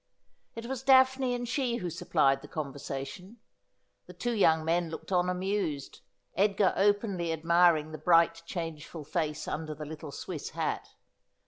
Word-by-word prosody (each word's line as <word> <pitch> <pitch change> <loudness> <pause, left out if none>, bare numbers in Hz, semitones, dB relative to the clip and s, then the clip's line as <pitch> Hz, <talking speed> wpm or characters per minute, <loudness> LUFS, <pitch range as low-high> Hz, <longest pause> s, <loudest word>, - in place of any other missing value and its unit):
It 230 0 -6
was 260 0 -4
Daphne 260 -1 +4
and 245 0 -4
she 250 -1 0
who 180 -7 -3
supplied 155 -6 +2
the - - -11
conversation. 140 - -6 0.7
The - - -11
two 240 - -2
young 160 -7 +3
men 170 +1 +1
looked 160 +4 -8
on 180 -1 +2
amused; 180 -6 -2 0.3
Edgar 195 0 +2
openly 200 -4 +1
admiring 165 -1 +3
the 155 - -7
bright 165 +1 +4
changeful 165 -2 -6
face 155 0 -2
under 155 0 -4
the 150 +1 -7
little 155 0 -8
Swiss - - -6
hat. - - -2
175 Hz, 145 wpm, -30 LUFS, 155-205 Hz, 0.7 s, Daphne